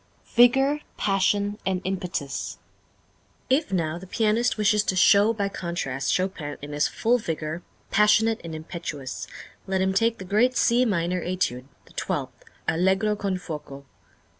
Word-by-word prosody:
Vigor, 270 +5 +5 0.2
Passion, 200 +1 +1
and 190 -1 0
Impetus. 180 -8 -3 0.9
If 290 0 +2
now 170 -3 -1
the 190 - -11
pianist 225 +4 +1
wishes 210 0 +3
to 190 - 0
show 200 +4 +6
by 205 -3 -1
contrast 170 -9 -3
Chopin 180 -6 -2
in 145 +1 -8
his 150 0 +1
full 245 +2 +1
vigor, 160 -3 -4 0.3
passionate 215 +2 +4
and 165 -1 -6
impetuous, 155 -5 -6 0.4
let 190 0 0
him 190 0 +1
take 225 +4 +2
the 190 - -8
great 225 +7 +2
C 245 +2 +4
Minor 180 -4 0
Étude, 175 -9 -1 0.2
the - - -20
twelfth, - - -3 0.3
Allegro 190 +5 +2
con 195 -2 -2
fuoco. 150 -5 -8
190 Hz, 140 wpm, -25 LUFS, 165-215 Hz, 0.9 s, show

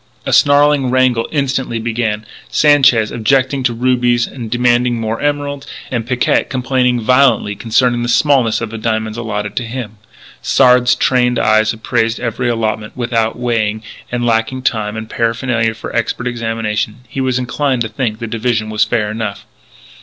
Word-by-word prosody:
A - - -1
snarling 145 -2 +4
wrangle 125 -2 +2
instantly 135 -5 -1
began, 110 -2 -2 0.2
Sanchez 135 -7 +4
objecting 130 +4 +1
to 125 -1 +1
rubies 120 -1 +1
and 120 -4 -8
demanding 120 0 +1
more 115 0 -3
emeralds, 145 -1 -2 0.2
and 120 -3 -2
Picquet 125 -1 +1
complaining 125 -1 0
violently 125 -3 +3
concerning 120 +2 +1
the 120 - -2
smallness 130 -4 +2
of 115 -1 -4
the 115 - -6
diamonds 110 -1 -2
allotted 105 -2 -3
him. 115 -2 -6 0.4
Sard's 125 -1 +4
trained 125 -1 +2
eyes 110 0 +3
appraised 115 0 -1
every 120 +1 -2
allotment. 110 -1 -2
Without 115 -2 -1
weighing, 110 -3 -1 0.3
and, 120 0 -1
lacking 115 +3 0
time 110 -3 -1
and 110 0 -6
paraphernalia 115 -1 -1
for 110 - -8
expert 115 +1 -1
examination, 115 -2 -3
he 135 +3 -4
was 130 -1 0
inclined 125 0 -1
to - - -3
think 110 -2 -3
the 115 - -5
division 110 -1 -2
fair 105 0 +1
enough. 110 -2 -5
120 Hz, 150 wpm, -16 LUFS, 110-125 Hz, 0.4 s, snarling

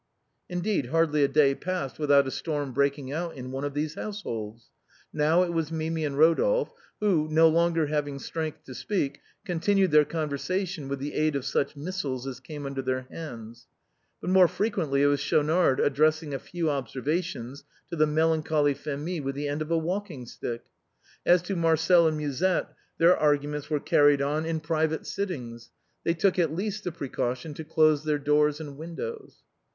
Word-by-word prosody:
Indeed, 180 - -1
hardly 150 0 +2
a - - +5
day 140 -1 +4
passed 180 -3 -4
without 145 -2 +4
a - - -3
storm 145 -4 -3
breaking 140 0 0
out 165 +3 -3
in 130 -1 -7
one 135 +1 -4
of 145 -1 -3
these 150 +1 -1
households. 115 - -6 0.4
Now 155 +4 +3
it 175 -1 -2
was 165 -1 -1
Mimi 160 0 -2
and 140 -2 -3
Ro 160 +3 +6
dolphe - - +1 0.3
who, 180 -8 +2
no 160 +1 +6
longer 165 -1 +2
liaving 145 -2 -2
strength 160 +1 -5
to 130 - -10
speak, 145 -1 -2 0.2
continued 190 +1 +2
their 150 0 +7
conversation 165 +2 -3
with 140 0 -3
the 140 +2 -5
aid 155 -1 +1
of 140 -2 -2
such 140 +1 -1
missiles 145 -5 -4
as 130 -2 -6
came 145 +3 -8
under 135 -1 -3
their 130 0 -2
hands. 120 -7 -9 0.5
But 180 - -3
more 185 -1 +7
frequently 165 -10 0
it - - +5
was 145 0 +3
Schaunard 150 0 +2
addressing 155 +1 +2
a 135 - -2
few 170 -3 -2
observations 140 +1 -3 0.3
to - - -2
the 155 -1 +3
melancholy 155 -1 +2
Phémie 150 +4 -4
with 135 0 -3
the 145 +1 -3
end 145 +2 -2
of 155 - -4
a 165 - +2
walking 170 -5 -3
stick. 115 0 -6 0.6
As 175 0 +5
to 195 +2 -3
Marcel 165 0 +4
and 155 -1 0
Musette, 150 +5 0 0.2
their 170 +2 +6
arguments 145 -1 0
were 150 -2 +1
carried 145 0 +4
on 150 +3 -1
in 160 -1 -2
private 160 0 -1
sittings; 120 -12 -5 0.3
they 165 - +1
took 185 +2 +2
at 160 -3 +1
least 205 +2 -3
the 180 - -1
precaution 135 -2 -3
to 160 - -7
close 155 -1 +3
their 155 -1 +1
doors 150 +1 +2
and 145 -3 -8
win 165 +1 -7
dows. 460 - -7
155 Hz, 180 wpm, -27 LUFS, 140-165 Hz, 0.6 s, their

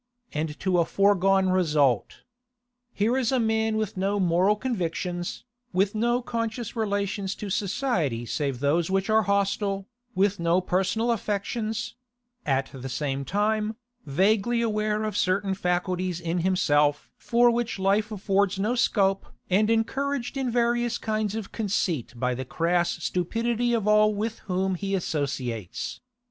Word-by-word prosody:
And 150 0 -3
to 185 -2 +2
a - - +5
foregone 195 0 +3
result. 150 - +1 0.7
Here 225 +4 +1
is 260 -2 +1
a 260 - +2
man 220 -1 +1
with 215 -3 -2
no 200 +2 0
moral 185 +3 +3
convictions, 180 -6 -3 0.3
with 195 +2 +2
no 240 +3 +1
conscious 230 -1 -3
relations 200 -2 -1
to 205 -2 -6
society 185 - -1
save 135 0 -2
those 160 +4 +2
which 195 +2 0
are 220 0 +5
hostile, 200 -1 0 0.3
with 200 +1 +2
no 170 +1 +3
personal 195 +6 0
affections; 215 +1 -2 0.5
at 135 -1 0
the 135 0 -6
same 140 0 -2
time, 215 - 0 0.3
vaguely 200 +10 +2
aware 215 -1 0
of 215 -2 -3
certain 195 +1 +1
faculties 180 -1 -1
in 170 +1 -2
himself 150 -5 +2
for 240 0 +3
which 235 -2 -1
life 200 +3 +1
affords 200 -1 +1
no 210 +5 0
scope 195 -5 +1 0.2
and 210 +4 +3
encouraged 265 +4 0
in 265 -2 -1
various 240 0 +1
kinds 215 -1 -2
of 220 -3 -5
conceit 180 - -1
by 125 +1 0
the 130 +2 -4
crass 170 +6 0
stupidity 230 +6 0
of 225 -3 0
all 210 0 +4
with 220 +2 -3
whom 190 +1 +1
he 195 +2 -2
associates. 135 - -3
195 Hz, 140 wpm, -26 LUFS, 175-220 Hz, 0.7 s, a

